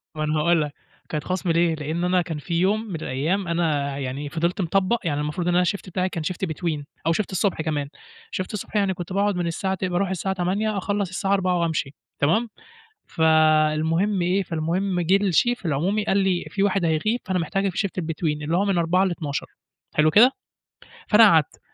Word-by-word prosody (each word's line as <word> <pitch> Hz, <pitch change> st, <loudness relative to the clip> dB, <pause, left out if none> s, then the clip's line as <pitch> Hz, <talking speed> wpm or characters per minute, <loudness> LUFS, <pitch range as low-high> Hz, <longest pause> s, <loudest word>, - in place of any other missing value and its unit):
ما 155 Hz, -, -2 dB
أنا 155 Hz, 0 st, 0 dB
هاقول 170 Hz, +1 st, +3 dB
لك 145 Hz, -1 st, -3 dB, 0.4 s
كانت 150 Hz, -2 st, -3 dB
خصم 185 Hz, -1 st, -1 dB
ليه، 165 Hz, -1 st, +2 dB
لأن 155 Hz, +3 st, -3 dB
أنا 180 Hz, 0 st, +2 dB
كان 165 Hz, -3 st, -4 dB
في 170 Hz, +4 st, -6 dB
يوم 205 Hz, +4 st, +2 dB
من 185 Hz, -, -5 dB
الأيام 160 Hz, +6 st, -2 dB
أنا 150 Hz, -5 st, 0 dB
يعني 140 Hz, +2 st, -4 dB
فضلت 170 Hz, +5 st, -1 dB
مطبق، 195 Hz, +6 st, +1 dB
يعني 150 Hz, -3 st, -1 dB
المفروض 150 Hz, +4 st, -3 dB
إن 175 Hz, -, +2 dB
أنا 180 Hz, -, +5 dB
الشيفت 185 Hz, +1 st, -2 dB
بتاعي 185 Hz, +1 st, -1 dB
كان 165 Hz, -3 st, -4 dB
شيفت 185 Hz, +3 st, -2 dB
between 160 Hz, -2 st, -3 dB, 0.2 s
أو 165 Hz, -, +4 dB
شيفت 200 Hz, +1 st, -2 dB
الصبح 190 Hz, -3 st, 0 dB
كمان، 145 Hz, -3 st, -2 dB, 0.4 s
شيفت 185 Hz, +3 st, -4 dB
الصبح 210 Hz, +1 st, -6 dB
يعني 200 Hz, -2 st, +2 dB
كنت 175 Hz, +1 st, -7 dB
باقعد 200 Hz, 0 st, +1 dB
من 175 Hz, -1 st, -1 dB
الساعة 190 Hz, +3 st, -1 dB
ت 185 Hz, -, -3 dB
باروح 180 Hz, +2 st, 0 dB
من -, -, -4 dB
الساعة 190 Hz, +1 st, -2 dB
08:00 200 Hz, +4 st, -1 dB
أخلص 200 Hz, -1 st, -1 dB
الساعة 195 Hz, +1 st, -1 dB
16:00 185 Hz, -2 st, +1 dB
وأمشي، 160 Hz, -4 st, -1 dB, 0.3 s
تمام. 215 Hz, +11 st, +2 dB, 0.6 s
فالمهم 160 Hz, +4 st, +3 dB
إيه، 185 Hz, +3 st, +1 dB
فالمهم 175 Hz, +3 st, -1 dB
جِه 180 Hz, +4 st, +3 dB
الشيف 200 Hz, +3 st, +1 dB
العمومي 185 Hz, +8 st, 0 dB
قال 195 Hz, -, +2 dB
لي: 190 Hz, -2 st, +1 dB
"في 195 Hz, -, -1 dB
واحد 195 Hz, -3 st, +1 dB
هيغيب 215 Hz, +10 st, +1 dB
فأنا 190 Hz, -2 st, 0 dB
محتاجك 195 Hz, +4 st, -1 dB
في -, -, -10 dB
شيفت 195 Hz, -3 st, -1 dB
الbetween" 155 Hz, -2 st, -2 dB
اللي 165 Hz, +4 st, 0 dB
هو 200 Hz, -, +2 dB
من 195 Hz, -3 st, +1 dB
16:00 175 Hz, +3 st, +2 dB
ل00:00، 160 Hz, -6 st, -3 dB, 0.5 s
حلو 155 Hz, +1 st, +4 dB
كده؟ 240 Hz, -, +7 dB, 0.8 s
فأنا 225 Hz, +1 st, +7 dB
قعدت 160 Hz, -8 st, +4 dB
175 Hz, 200 wpm, -23 LUFS, 160-195 Hz, 0.8 s, كده